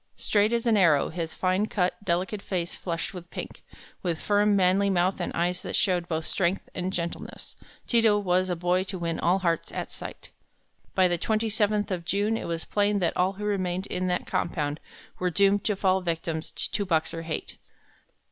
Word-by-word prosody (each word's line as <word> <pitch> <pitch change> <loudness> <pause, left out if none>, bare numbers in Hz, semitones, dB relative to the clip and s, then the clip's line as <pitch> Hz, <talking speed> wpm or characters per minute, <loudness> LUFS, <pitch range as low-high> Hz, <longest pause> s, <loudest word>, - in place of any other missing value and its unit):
Straight 210 +1 +2
as 235 0 0
an 225 -2 +4
arrow, 160 -7 +4
his 165 -1 -4
fine 185 +3 +1
cut, 185 0 -1
delicate 185 +2 -1
face 175 -4 -3
flushed 170 +4 -4
with 175 -2 -9
pink, - - -7 0.4
with 170 -3 -1
firm, 205 0 +3
manly 195 +1 +3
mouth 185 0 +2
and 175 - -2
eyes 180 +1 0
that - - -4
showed 180 -3 +1
both 160 -1 -2
strength 190 0 0
and 185 +1 -2
gentleness, 170 -2 -5 0.3
Ti 235 -2 +3
to 215 -2 +5
was 185 -2 +1
a 180 - 0
boy 180 +2 +1
to 190 0 -4
win 170 -2 -2
all 180 +3 +3
hearts 170 -3 -1
at - - -4
sight. - - -9 0.6
By 185 -1 +5
the 175 -1 0
twenty 220 +3 0
seventh 210 -1 +1
of 180 -2 -2
June 205 +5 +1
it - - -4
was 165 -1 -3
plain 205 0 +1
that 180 -4 0
all 185 +2 +2
who 210 +2 -6
remained 185 -2 -1
in 185 -1 -2
that 180 0 0
compound 150 -3 -1 0.4
were 180 - +1
doomed 200 +2 +3
to 210 - +2
fall 190 -1 +2
victims 165 -2 -2
to 205 - -2
Boxer 165 -2 0
hate. 160 -1 -5
185 Hz, 195 wpm, -27 LUFS, 170-205 Hz, 0.6 s, to